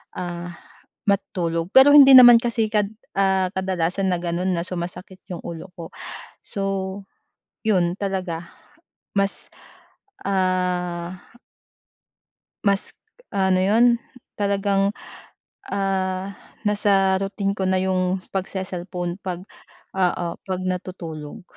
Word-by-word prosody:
ah, 175 -1 -5 0.5
matulog, 170 -4 0
pero 265 +2 +9
hindi 275 -2 +9
naman 240 -2 +10
kasi 235 -2 0
kad 210 -2 +2 0.3
ah, 190 -1 +2
kadalasan 190 0 0
na 180 - +1
gano'n 175 +2 -1
na 170 - -1
sumasakit 180 +1 -6
'yung 170 - -5
ulo 170 +2 -7
ko 165 -1 -8 0.5
so, 200 - -5 1.1
'yun 180 -4 +2
talaga, 185 -4 -3 0.7
mas 200 0 +1 0.8
ah 180 -2 0 1.5
mas 200 -1 +1 0.4
ano 190 -2 +2
'yun, 215 +6 +4 0.5
talagang, 200 0 +1 0.8
ah, 190 -1 -1 0.3
nasa 200 -2 +3
routine 195 0 -2
ko 195 - -4
na 185 0 +2
'yung 185 0 0 0.2
pagse-cellphone 185 -2 -3
pag, 180 -1 -4 0.5
oo, 180 -2 +1 0.2
'pag 185 -1 -3
natutulog, 175 -1 -5
190 Hz, 100 wpm, -23 LUFS, 180-195 Hz, 1.5 s, naman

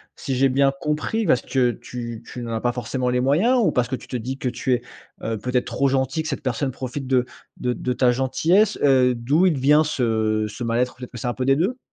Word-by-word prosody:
si 135 -2 -3
j'ai 135 +1 +3
bien 135 +1 +3
compris? 155 +9 -1
Parce 125 - +3
que 125 -2 +1
tu 120 -1 -7
tu 125 - -8
n'en 115 -1 -4
as 110 - -2
pas 120 - +1
forcément 125 +1 -2
les 125 0 +1
moyens 180 - +3
ou - - +3
parce 125 -1 +1
que 130 - -2
tu - - -12
te 125 - -3
dis 130 +4 -5
que 125 - -1
tu 130 +1 -1
es, 120 - 0 0.4
heu, 115 -1 -2
peut-être 125 +3 -1
trop 140 - 0
gentil, 135 +4 0
que 155 - -4
cette 135 - -3
personne 130 +1 -1
profite 130 +2 -5
de 130 -1 +2 0.3
de 125 0 -1
de 125 0 -2
ta 125 -1 +3
gentillesse? 170 - +2
Heu, 130 -3 +4
d'où 140 +10 +2
il 175 - +4
te 135 - -3
vient 150 +4 +5
ce 110 -6 0
ce 110 +4 -7
mal 115 +1 0
être? 125 0 0
Peut-être 125 -1 -9
que 120 - -9
c'est 120 - -3
un 120 - -1
peu 130 - -2
des 135 0 +4
2? 200 - 0
130 Hz, 260 wpm, -22 LUFS, 120-140 Hz, 0.4 s, vient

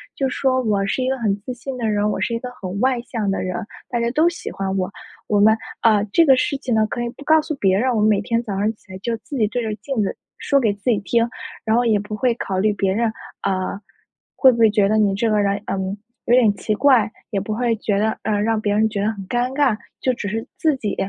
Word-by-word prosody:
就 270 -1 0
说 260 0 +1
我 205 -4 +1
是 240 +6 -1
一 255 - 0
个 265 - 0
很 210 -4 0
自 250 +4 -5
信 255 +1 -6
的 230 -2 -1
人， 210 0 +1
我 - - -2
是 230 - -1
一 230 - -1
个 250 - -6
很 190 +1 -4
外 255 -1 +2
向 225 -5 -3
的 - - -1
人 185 -1 -3 0.3
大 240 - -1
家 235 0 +1
都 315 +6 +3
喜 345 - -7
欢 195 -1 -3
我。 185 +1 -1 0.4
我 205 -1 +2
们 220 +2 +5 0.2
呃， 215 -3 +4
这 335 - +5
个 270 -3 +6
事 275 +2 0
情 250 -4 -2
呢， 220 0 +3
可 240 - -4
以 235 - -2
不 280 - -13
告 315 +1 +5
诉 310 -1 -4
别 195 -6 +2
人， 255 +4 +1
我 - - +1
们 210 - +4
每 200 -1 +3
天 230 +2 0
早 205 -4 -4
上 210 +2 +1
起 205 - -20
来 185 - -7
就 230 +3 -2
自 280 - -9
己 215 - +2
对 240 +4 -2
着 215 -1 -2
镜 260 0 -3
子 - - -2 0.2
说 280 - +2
给 220 -5 +2
自 205 0 -19
己 210 - +2
听， 230 +3 +1 0.4
然 220 - +2
后 240 +1 +2
也 215 -3 +3
不 210 +1 -5
会 245 +1 +1
考 190 -5 -3
虑 210 +1 +2
别 195 -1 0
人， 225 +1 +1 0.3
呃， 190 0 -2 0.6
会 260 -2 +6
不 235 - -3
会 225 - +6
觉 205 -1 +3
得 215 - +2
你 205 -2 +3
这 225 +2 +1
个 210 - +3
人， 200 0 +1
呃， - - -2 0.5
有 240 - +4
点 225 -5 +5
奇 215 - -2
怪， 240 -4 +4 0.2
也 200 - 0
不 210 +2 -3
会 235 -1 +1
觉 205 -1 -1
得 220 +2 0
呃， 210 -1 0
让 220 0 +1
别 205 -1 0
人 220 +1 +3
觉 200 -2 -3
得 210 - +1
很 195 -2 -9
尴 245 +2 0
尬， 280 -6 +3 0.3
就 255 - +2
只 205 - -5
是 225 +3 -3
自 310 -3 +2
己， 210 -5 -3
220 Hz, 295 characters per minute, -21 LUFS, 205-245 Hz, 0.6 s, 个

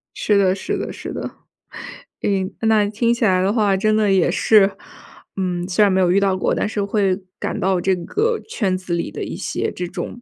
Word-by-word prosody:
是 210 - +1
的 190 -2 +3
是 190 - -3
的 - - -4
是 - - -7
的。 - - -5 0.9
哎， 190 -2 0
那 220 -2 +3
听 230 +3 +1
起 235 - -3
来 185 -3 +3
的 190 +2 +1
话， 210 -4 +2
真 215 +2 +2
的 215 -2 +2
也 190 -3 +3
是， 205 -3 +4 0.6
嗯， 180 -2 -2
虽 195 +3 +3
然 200 - +4
没 190 - +2
有 180 - +3
遇 195 - +4
到 195 -1 +1
过， 185 - 0
但 - - -1
是 210 -1 -2
会 200 -1 0 0.2
感 - - -3
到 190 0 +1
这 190 +2 +1
个 430 - -1
圈 195 - 0
子 185 -1 -5
里 170 - -2
的 - - -5
一 - - -5
些 - - -3
这 180 - -5
种， 240 - -7
195 Hz, 235 characters per minute, -20 LUFS, 185-215 Hz, 0.9 s, 是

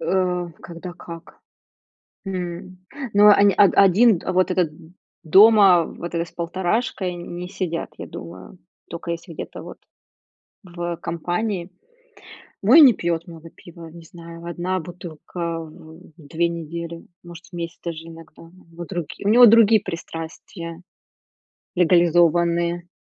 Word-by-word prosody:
Э, 180 +1 -1
когда 175 +1 -9
как. 170 -2 -12 0.9
М, 185 0 -6 0.3
ну, 205 +1 +5
он, 205 -1 +6
а, - - +7 0.2
один 200 +1 +4
вот 185 0 +1
этот 180 -4 0 0.5
дома, 195 0 +6
вот 170 +2 -8
это, 170 0 -1
с - - -17
полторашкой 185 +2 -2
не 175 +1 -7
сидят, 175 -3 -4
я - - -8
думаю. 95 - -11 0.3
Тока 170 0 -6
если 170 +1 -7
где-то - - -8
вот - - -10 0.9
в, 175 -2 -5
компании. 175 +3 -3 0.9
Мой 260 +11 +7
не 260 -5 +8
пьёт 170 -3 -3
много 165 -1 -12
пива, 170 -1 -13
не 170 +1 -13
знаю, 170 +1 -12
1 175 +2 -3
бутылка 170 -1 -7
в 160 0 -12 0.2
2 165 +2 -2
недели, 170 0 -7 0.2
может, 175 0 -12
в - - -25
месяц 170 -1 -6
даже 165 -1 -6
иногда. 165 -1 -14
У 165 - -15 0.2
него 175 +1 -8
другие 175 +2 -6
унего 240 +4 +8
другие 225 -1 +6
пристрастия 165 +1 -8 0.9
легализованные. 170 0 +2
175 Hz, 130 wpm, -22 LUFS, 165-185 Hz, 0.9 s, не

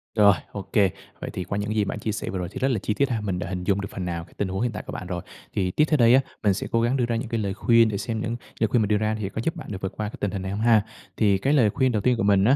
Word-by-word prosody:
Rồi, 105 -2 +7 0.2
ô 100 - -5
kê. 100 -3 +5 0.3
Vậy - - -4
thì 90 - -3
qua 100 - -3
những 105 +1 -2
gì 105 -2 +2
bạn 105 - -4
chia 110 - -2
sẻ 105 - -4
vừa 95 - -3
rồi 90 - -3
thì - - -6
rất 135 - +2
là 115 - 0
chi 105 - -1
tiết 140 +4 +1
ha, 115 -4 -1
mình 95 -4 -2
đã 90 - -4
hình 90 -2 -3
dung 100 +1 +1
được 100 - -4
phần 90 - -4
nào 85 -1 -3
cái - - -18
tình 100 - 0
huống 95 +3 -3
hiện 120 - +1
tại 105 - -6
của - - -5
bạn 95 - -6
rồi. 90 -1 -3 0.3
Thì 95 -2 0
tiếp 150 - +3
theo 155 - +3
đây 120 -2 +6
á, 135 - +5 0.2
mình 100 - +4
sẽ 95 - -4
cố 115 - +2
gắng 120 +3 +2
đưa 125 - +2
ra 120 - -1
những 115 +1 -3
cái 115 - -1
lời 100 -2 -1
khuyên 115 +2 +4
để 100 - -2
xem 110 +1 -3
những 115 +1 -2 0.2
lời 110 - +3
khuyên 115 +2 +2
mình 105 - 0
đưa 105 - +3
ra 110 +1 0
thì 100 -3 -2
có 110 - -4
giúp 165 - -1
bạn - - -8
được 95 -2 -5
vượt 95 - -3
qua 105 -1 -2
cái - - -9
tình 100 - -1
hình 100 - -3
này 95 0 -4
hông 105 +2 -3
ha. 115 -2 +5 0.4
Thì 100 -3 +4
cái 135 +9 +1
lời 125 -8 +5
khuyên 130 +4 +1
đầu 105 -3 0
tiên 125 +2 +2
của 115 - 0
mình 100 -1 +4
á 130 +5 +5
105 Hz, 380 wpm, -25 LUFS, 100-115 Hz, 0.4 s, Rồi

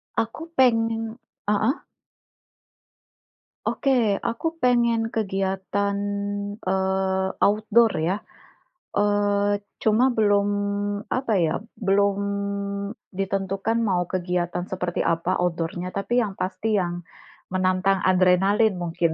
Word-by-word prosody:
Aku 230 +8 -2
pengen 225 -2 +2 0.3
heeh. 215 - +1 1.8
Oke, 275 - 0 0.3
aku 235 +6 -3 0.2
pengen 235 -2 +3
kegiatan, 195 -1 -1 0.7
eee, 190 0 +1 0.2
outdoor 220 +2 +4 0.2
ya. 185 - +1 0.8
Eee, 205 0 +2 0.2
cuma 220 +3 +4
belum 205 -2 +3 0.6
apa 255 -3 -1
ya, 160 - +1 0.3
belum 200 +1 +3 1.0
ditentukan 195 +3 -1
mau 195 -6 +1
kegiatan 180 -1 -1
seperti 180 -2 -2
apa 165 +2 0
outdoor-nya, 175 +1 -2
tapi 200 +5 0
yang 205 -4 -3
pasti 215 +4 -2
yang 175 -1 -4 0.5
menantang 185 +1 +2
adrenalin 190 +3 +4
mungkin. 170 0 0
200 Hz, 90 wpm, -24 LUFS, 185-220 Hz, 1.8 s, outdoor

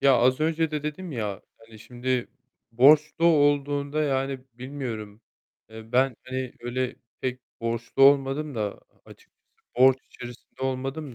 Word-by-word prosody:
Ya, 135 -2 +5
az 130 +4 +3
önce 160 0 +1
de 150 -1 -3
dedim 155 +3 -5
ya, 105 -5 -3 0.2
hani, 115 -1 -16
şimdi 125 +2 -2 0.4
borçlu 150 +6 +5
olduğunda, 145 -1 +2
yani, 135 -1 0 0.2
bilmiyorum, 120 -5 -6 0.5
ııı, 110 +1 -11
ben, 130 -1 +3
hani, 130 -1 -4
öyle 125 +2 -3 0.2
pek 125 0 -3 0.2
borçlu 115 +3 -1
olmadım 140 +1 +4
da 105 -2 -3 0.2
açıkçası, - - -18 0.4
borç 130 +1 +6
içerisinde 120 +1 -12
olmadım 135 +2 -3
130 Hz, 130 wpm, -26 LUFS, 120-145 Hz, 0.5 s, borç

